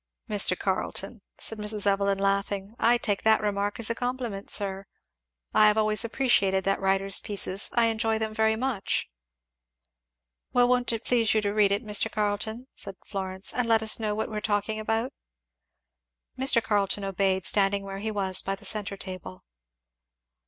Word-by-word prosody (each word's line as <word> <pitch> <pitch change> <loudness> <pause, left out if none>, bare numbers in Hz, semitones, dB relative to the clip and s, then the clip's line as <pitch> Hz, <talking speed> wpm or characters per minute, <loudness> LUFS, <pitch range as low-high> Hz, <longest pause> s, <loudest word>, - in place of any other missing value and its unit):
"Mr. 205 -4 +3
Carleton," 195 +3 -2 0.2
said 225 - -5
Mrs. 210 0 -2
Evelyn 200 0 +2
laughing, 200 +1 -1
"I 240 +1 +4
take 205 -4 -1
that 220 0 +4
remark 205 0 -2
as 230 0 -1
a - - +1
compliment, 245 -4 -4
sir. 195 -1 0 0.7
I 215 0 +6
have 210 +1 +3
always 215 +1 +2
appreciated 220 -6 +1
that 195 0 0
writer's 195 0 +2
pieces 200 -1 -2
I 235 -1 +4
enjoy 225 0 0
them 220 0 -3
very 220 0 +2
much." 235 -4 -1 1.5
"Well, 245 -1 +5
won't 245 -1 +2
you 230 - -2
please 230 -1 +1
read 210 -1 +2
it, 200 +4 0
Mr. 210 -2 +1
Carleton?" 215 +3 -2
said 195 -1 -7
Florence, 190 -1 -3
"and 245 0 0
let 225 -1 +4
us 220 - +4
know 210 -2 -1
what 220 +1 -3
we - - -6
are 210 - -2
talking 215 +1 -1
about." 225 +3 -2 1.2
Mr. 260 -3 +3
Carleton 205 -1 0
obeyed, 190 -1 0
standing 200 -1 +2
where 195 0 -6
he 220 +2 -3
was 195 -3 0
by 195 - -2
the - - -12
centre 205 -2 -1
table. 185 - -9
210 Hz, 165 wpm, -27 LUFS, 195-220 Hz, 1.5 s, I